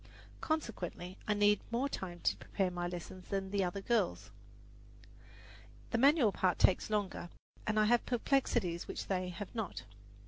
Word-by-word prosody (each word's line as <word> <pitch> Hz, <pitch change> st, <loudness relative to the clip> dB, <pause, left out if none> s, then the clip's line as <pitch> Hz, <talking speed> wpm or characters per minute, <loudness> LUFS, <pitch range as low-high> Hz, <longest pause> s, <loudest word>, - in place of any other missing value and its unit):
Consequently 190 Hz, -, -3 dB
I 210 Hz, -, +2 dB
need 205 Hz, 0 st, +4 dB
more 240 Hz, +4 st, +1 dB
time 175 Hz, -9 st, -5 dB
to -, -, +2 dB
prepare 190 Hz, -2 st, -1 dB
my 175 Hz, 0 st, -2 dB
lessons 180 Hz, +1 st, -7 dB
than 195 Hz, 0 st, -2 dB
other 185 Hz, +2 st, -1 dB
girls. 215 Hz, -3 st, 0 dB, 1.6 s
The 230 Hz, -, +1 dB
manual 275 Hz, -4 st, +6 dB
part 185 Hz, -2 st, +1 dB
takes 190 Hz, -, +3 dB
longer, 205 Hz, -4 st, -1 dB, 0.4 s
and 215 Hz, 0 st, +2 dB
I 215 Hz, -, +5 dB
have 240 Hz, +2 st, +4 dB
perplexities 235 Hz, -8 st, +1 dB
which -, -, -4 dB
they 185 Hz, -2 st, -1 dB
have 180 Hz, +3 st, -7 dB
not. 220 Hz, -5 st, -4 dB
200 Hz, 145 wpm, -34 LUFS, 180-230 Hz, 1.6 s, manual